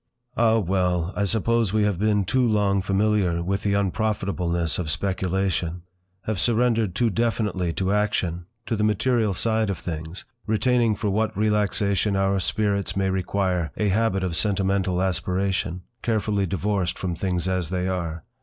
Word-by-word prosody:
Ah! 115 -1 +4
well! 90 -3 0
I 100 - +1
suppose 110 +1 +1
we 110 -1 +3
have 100 -4 0
been 105 -1 +2
too 130 +7 +1
long 105 -4 +2
familiar 95 -3 +1
with 95 +2 -1
the 100 -1 +1
unprofitableness 95 -5 0
of 85 -4 -2
speculation, 90 0 -1 0.4
have 105 -2 -2
surrendered 115 -4 +1
too 120 -2 +2
definitely 105 -5 0
to 95 +3 0
action—to 105 +2 -2
the 105 - -1
material 110 0 +1
side 110 +1 +1
of 100 - -2
things, 80 +1 -6 0.2
retaining 115 0 +2
for 105 0 -1
what 110 +1 0
relaxation 105 -1 +1
our 95 0 +1
spirits 100 +1 -1
may 95 -1 +1
require, 95 -2 -1
a 105 -1 +1
habit 100 -1 +1
of 90 -3 -1
sentimental 95 -1 +1
aspiration, 90 -1 -1 0.2
carefully 105 -3 0
divorced 95 0 -1
from 90 -2 -2
things 90 0 -1
as 90 -3 -1
they 90 0 -1
are. 85 -4 -3
100 Hz, 150 wpm, -24 LUFS, 90-110 Hz, 0.4 s, Ah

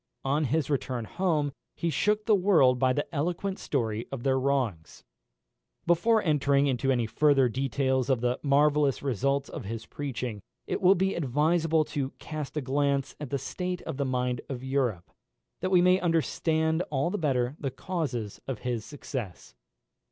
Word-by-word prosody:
On 145 +3 +1
his 145 +2 0
return 125 -4 -1
home 155 - 0 0.2
he 170 - -1
shook 210 +5 +1
the 220 - +4
world 175 -11 +4
by 130 0 +3
the 145 +3 0
eloquent 175 +6 -2
story 115 -5 -2
of 130 -3 -5
their 130 -1 +2
wrongs. 130 - -1 0.8
Before 215 +6 +3
entering 140 -3 +3
into 135 0 +1
any 120 -3 +1
further 140 +2 +3
details 130 +1 0
of 130 -3 +3
the 125 +2 0
marvellous 145 -1 +3
results 140 +2 0
of 140 - -7
his 110 +2 -5
preaching, 125 -7 -5 0.2
it - - -3
will 190 +1 +6
be 190 +1 +1
advisable 160 +2 +2
to 140 -3 -3
cast 155 -1 -6
a - - +1
glance 140 0 0
at 150 -3 -6
the 140 - 0
state 180 +7 -4
of - - -5
the 140 - 0
mind 125 -2 -1
of 130 -2 -5
Europe, 130 -9 -1 0.5
that 185 - -1
we 180 -2 +5
may 180 +1 +5
understand 160 -1 +1
all 145 +4 0
the 210 - -2
better 130 -4 0
the 140 - -2
causes 130 - -4
of 135 -4 -3
his 120 -3 -2
success. 130 -7 -7
140 Hz, 165 wpm, -28 LUFS, 125-160 Hz, 0.8 s, will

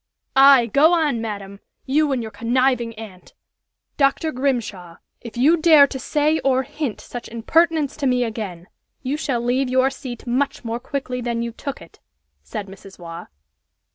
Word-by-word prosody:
"Aye! 270 -2 +7
go 285 - +4
on, 295 -8 0
madam! 200 -3 -6 0.3
You 295 +2 +2
and 255 -3 -1
your 220 - -7
conniving 240 0 0
aunt 210 -5 -12 0.3
" - - -56
"Dr. 275 +3 +2
Grimshaw, 225 - -3 0.2
if 235 0 -10
you 300 +8 +4
dare 315 -3 +7
to 265 -1 -6
say 305 +3 +1
or 265 -1 +1
hint 270 -3 -4
such 245 - -8
impertinence 310 +5 +1
to 285 -3 -1
me 250 -1 +2
again, 210 -7 -5 0.4
you 265 +2 -1
shall 270 -6 -2
leave 250 +2 0
your 260 +1 +2
seat 255 -3 -8
much 260 +1 -1
more 230 +1 -3
quickly 255 -1 -4
than 235 -1 -2
you 235 - -4
took 275 +4 -7
it," - - -19 0.4
said 135 - -6
Mrs. 195 0 -13
Waugh. 170 -1 -9
250 Hz, 170 wpm, -21 LUFS, 225-280 Hz, 0.4 s, Aye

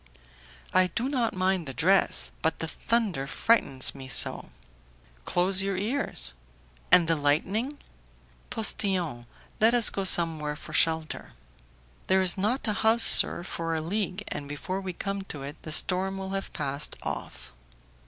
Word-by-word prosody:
"I 185 0 +4
do 230 +7 -3
not 250 -7 -1
mind 185 -3 0
the 135 - -7
dress; 190 +9 +2
but 160 - 0
the 165 - -4
thunder 200 -8 -1
frightens 140 - +2
me 135 -1 -10
so!" 130 - +2 0.8
"Close 185 +2 +2
your 195 -1 -2
ears." 210 - -2 0.6
"And 170 -2 +6
the 165 - +3
lightning?" 190 - -1 0.7
"Postillion, 180 - -2 0.3
let 225 +3 +4
us 235 -2 +5
go 195 - -3
somewhere 160 -5 0
for - - -11
shelter." 160 -1 -1 0.7
"There 190 0 +3
is 180 -2 +2
not 220 +7 -1
a 215 - +1
house, 225 +2 +4
sir, - - +8
for 165 -2 -4
a - - -1
league, 195 +3 -3
and 145 -1 -6
before 185 +7 -5
we 190 -1 -5
come 195 +3 -4
to 145 -7 -8
it, 140 +2 -7
the 155 - -8
storm 190 +4 0
will 190 0 -6
have 195 0 -4
passed 140 0 -3
off." - - -7
185 Hz, 155 wpm, -27 LUFS, 155-200 Hz, 0.8 s, sir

